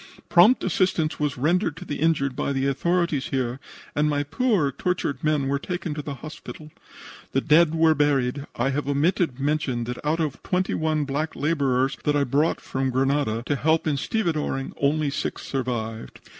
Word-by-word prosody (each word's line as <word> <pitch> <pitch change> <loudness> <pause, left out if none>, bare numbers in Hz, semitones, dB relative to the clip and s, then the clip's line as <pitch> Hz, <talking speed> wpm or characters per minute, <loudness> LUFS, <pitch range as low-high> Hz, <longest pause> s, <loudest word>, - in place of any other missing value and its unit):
Prompt 200 +9 +6
assistance 175 -4 0
was 145 -3 -1
rendered 160 - +1
to - - -8
the 145 - -4
injured 145 -5 +1
by - - -1
the 135 -1 0
authorities 170 +1 0
here 130 -1 -2 0.4
and 150 +1 +2
my 145 -1 0
poor, 170 - +1
tortured 145 -3 -2
men 150 -3 +1
were 140 +1 0
taken 175 0 -4
to 150 - -4
the 145 -1 -6
hospital. 155 +2 -10 0.6
The 135 - +2
dead 160 +2 +4
were 160 -1 +5
buried. 140 -2 +1
I 130 +3 0
have 145 +1 -2
omitted 150 0 +1
to 135 - -5
mention 140 -5 0
that 120 +1 -6
out 155 +3 0
of 155 -4 -2
twenty 185 0 -1
one 155 -1 0
black 145 +3 -2
laborers 135 -3 +1
that 150 -1 +1
I 145 - +3
brought 145 +5 +1
from 135 0 -2
Grenada 130 -3 0
to 145 - 0
help 155 +5 +1
in 155 -2 +1
stevedoring, 155 -5 -1
only 145 +1 +1
six - - -3
survived. 115 -4 -4
145 Hz, 180 wpm, -24 LUFS, 135-160 Hz, 0.6 s, Prompt